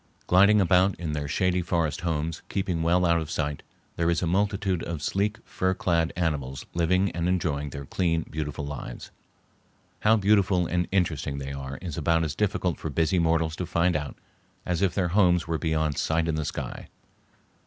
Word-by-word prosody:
Gliding 100 Hz, +4 st, +5 dB
about 95 Hz, +1 st, +4 dB
in 85 Hz, -3 st, -4 dB
their 75 Hz, -1 st, -3 dB
shady 90 Hz, +3 st, +1 dB
forest 85 Hz, -4 st, -1 dB
homes, 80 Hz, -2 st, -2 dB
keeping 90 Hz, -4 st, -1 dB
well 90 Hz, +2 st, +3 dB
out 85 Hz, -1 st, +3 dB
of 80 Hz, -, -6 dB
sight, 75 Hz, -3 st, -2 dB, 0.4 s
there 85 Hz, 0 st, +1 dB
is 85 Hz, +1 st, +1 dB
a -, -, +1 dB
multitude 95 Hz, 0 st, 0 dB
of 80 Hz, -3 st, -5 dB
sleek 100 Hz, +7 st, 0 dB
fur 95 Hz, 0 st, -1 dB
clad 85 Hz, -3 st, +1 dB
animals 75 Hz, -7 st, -2 dB
living 90 Hz, +3 st, +2 dB
and 85 Hz, +1 st, -1 dB
enjoying 75 Hz, -6 st, -1 dB
their 70 Hz, +1 st, -7 dB
clean, 85 Hz, 0 st, 0 dB
beautiful 75 Hz, -1 st, -4 dB
lives. 70 Hz, 0 st, -7 dB, 0.9 s
How 110 Hz, +1 st, +4 dB
beautiful 100 Hz, -3 st, +3 dB
and 90 Hz, +1 st, 0 dB
interesting 80 Hz, -7 st, 0 dB
they 70 Hz, 0 st, -5 dB
are 70 Hz, -1 st, -6 dB
is 85 Hz, -2 st, -4 dB
about 80 Hz, +1 st, +2 dB
as 75 Hz, -2 st, -2 dB
difficult 95 Hz, -2 st, -1 dB
for 80 Hz, -, -4 dB
busy 80 Hz, +5 st, +1 dB
mortals 80 Hz, -1 st, +1 dB
to 90 Hz, -, -3 dB
find 85 Hz, +1 st, +1 dB
out 75 Hz, -1 st, -3 dB, 0.5 s
as 90 Hz, 0 st, -1 dB
if 95 Hz, -3 st, +1 dB
their 90 Hz, -3 st, +1 dB
homes 90 Hz, -3 st, +3 dB
were 80 Hz, -1 st, -2 dB
beyond 80 Hz, -3 st, 0 dB
sight 80 Hz, +1 st, +1 dB
in 80 Hz, -, 0 dB
the 80 Hz, -1 st, -2 dB
sky. -, -, -5 dB
85 Hz, 185 wpm, -26 LUFS, 80-90 Hz, 0.9 s, Gliding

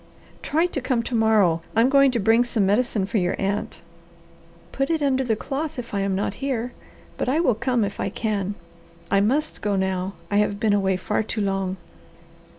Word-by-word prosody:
"Try 320 Hz, +3 st, +1 dB
to 325 Hz, -6 st, -3 dB
come 245 Hz, -2 st, 0 dB
to 250 Hz, -, -6 dB
morrow. 215 Hz, -7 st, +3 dB
I 225 Hz, -, +5 dB
am 245 Hz, -, +4 dB
going 275 Hz, 0 st, +5 dB
to 245 Hz, -2 st, -1 dB
bring 225 Hz, +4 st, +4 dB
some 230 Hz, -4 st, 0 dB
medicine 210 Hz, 0 st, +1 dB
for 210 Hz, +2 st, 0 dB
your 180 Hz, -1 st, 0 dB
aunt." 195 Hz, -3 st, -3 dB, 0.9 s
"Put 275 Hz, +2 st, -1 dB
it 320 Hz, -3 st, 0 dB
under 265 Hz, -1 st, +2 dB
the 230 Hz, -3 st, +1 dB
cloth 290 Hz, +7 st, -4 dB
if 245 Hz, -3 st, -7 dB
I 200 Hz, -, 0 dB
am 195 Hz, -1 st, 0 dB
not 200 Hz, +1 st, -1 dB
here; 250 Hz, -3 st, -2 dB, 0.5 s
but -, -, 0 dB
I 290 Hz, +5 st, +2 dB
will 295 Hz, -8 st, +3 dB
come 235 Hz, +1 st, 0 dB
if 200 Hz, 0 st, -4 dB
I -, -, -1 dB
can. 205 Hz, -2 st, -2 dB, 0.6 s
I 195 Hz, -, +4 dB
must 280 Hz, +9 st, 0 dB
go 205 Hz, -1 st, 0 dB
now; 190 Hz, 0 st, -1 dB, 0.2 s
I 205 Hz, -, +2 dB
have 205 Hz, -1 st, +1 dB
been 215 Hz, -1 st, +2 dB
away 190 Hz, -2 st, +2 dB
far 210 Hz, +4 st, -1 dB
too 220 Hz, 0 st, -3 dB
long." 195 Hz, -1 st, -1 dB
220 Hz, 205 wpm, -23 LUFS, 195-255 Hz, 0.9 s, I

